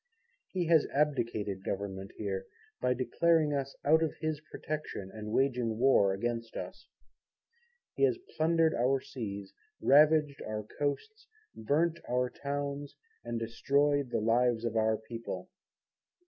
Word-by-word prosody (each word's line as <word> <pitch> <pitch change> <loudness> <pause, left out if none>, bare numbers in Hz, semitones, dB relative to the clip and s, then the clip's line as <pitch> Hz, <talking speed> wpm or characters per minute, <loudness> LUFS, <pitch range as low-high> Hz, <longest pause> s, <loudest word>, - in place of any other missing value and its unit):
He 180 -2 -2
has 160 -2 +4
abdicated 115 -9 0
Government 95 -1 -4
here, 100 -3 -3 0.3
by 125 0 +2
declaring 155 +4 +2
us 140 -1 -2
out 160 +3 +5
of 160 -2 0
his 155 -2 -2
Protection 150 -11 -5
and 105 -1 -6
waging 125 -3 +1
War 120 -6 +5
against 115 +3 -3
us. - - -7 1.1
He - - -7
has 385 -3 +1 0.2
plundered 165 0 +3
our 130 +3 +2
seas, 105 -8 -6 0.3
ravaged 150 0 +5
our 110 0 -4
Coasts, 435 - -4 0.3
burnt 160 +9 +1
our 125 0 +1
towns, 140 +1 -4 0.3
and 120 -1 -3
destroyed 140 +4 +1
the 115 - 0
lives 120 +1 +2
of 115 -1 -2
our 110 0 +2
people. 115 +1 -7
130 Hz, 130 wpm, -31 LUFS, 110-150 Hz, 1.1 s, out